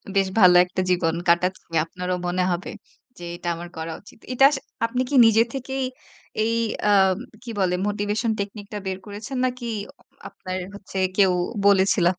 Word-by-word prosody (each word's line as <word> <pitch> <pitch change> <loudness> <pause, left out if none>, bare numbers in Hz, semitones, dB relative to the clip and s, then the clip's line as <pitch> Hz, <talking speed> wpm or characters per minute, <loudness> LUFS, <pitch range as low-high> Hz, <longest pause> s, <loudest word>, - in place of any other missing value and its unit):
বেশ 195 -1 +3
ভালো 180 -2 +7
একটা 180 +1 -3
জীবন 165 -2 +1
কাটাচ্ছে 180 +2 +1 0.2
আপনারও 180 +2 -3
মনে 180 +1 0
হবে 175 +2 -3 0.5
যে, 175 - -8
এটা 175 - -8
আমার 175 +1 -8
করা 160 0 -4
উচিত। 205 - -17
এটা 270 +2 +5
আস 280 - -1 0.3
আপনি 250 +2 -1
কি 285 - -1
নিজে 225 0 +5
থেকেই 265 0 -3 0.6
এই 230 +1 +1 0.4
আ - - +5 0.5
কি 240 - -9
বলে 180 -1 +2
মোটিভেশন 210 +2 -1
টেকনিকটা 205 +1 -5
বের 190 0 -2
করেছেন 215 +6 -6
নাকি 250 -1 -3 0.3
অ - - -37 0.4
আপনার 185 0 -6 0.2
হচ্ছে 195 -1 -6 0.2
কেউ 190 -2 +5 0.4
বলেছিল? 195 -2 +4
195 Hz, 160 wpm, -23 LUFS, 180-225 Hz, 0.6 s, ভালো